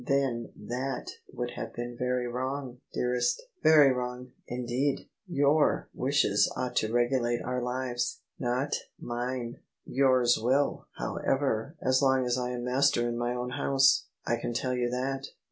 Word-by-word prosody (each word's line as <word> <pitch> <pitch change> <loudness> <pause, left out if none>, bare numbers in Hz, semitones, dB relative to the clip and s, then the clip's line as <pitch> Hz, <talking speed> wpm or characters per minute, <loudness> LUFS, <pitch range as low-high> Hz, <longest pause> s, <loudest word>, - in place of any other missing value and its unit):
" - - -12
Then 135 -4 0
that 125 +4 -3 0.2
would 120 0 -3
have 115 0 -6
been 120 0 -4
very 125 0 0
wrong, 130 +1 -3
dearest; 125 0 +1 0.2
very 150 -4 +7
wrong, 125 0 -4 0.2
indeed! 125 +3 -1 0.2
Your 145 -2 +2
wishes 125 -7 +2
ought 125 -1 -2
to 110 - +1
regulate 120 0 +1
our 125 0 -2
lives 125 0 -2
— - - -18
^not 125 +3 0 0.3
mine*' 120 0 -3 0.2
" - - -60
Yours 130 -3 +3
will, 135 +5 +1
however, 135 +1 -1
as 130 +1 +3
long 130 -2 +3
as 120 -1 +1
I 125 -1 -1
am 125 -1 -4
master 125 -1 +2
in 120 - -2
my 120 +1 -1
own 125 0 -3
house. 135 +1 +3 0.2
I 120 - +1
can 115 0 -4
tell 130 +1 0
you 120 -1 0
that." 135 +2 -2
125 Hz, 160 wpm, -29 LUFS, 120-135 Hz, 0.3 s, very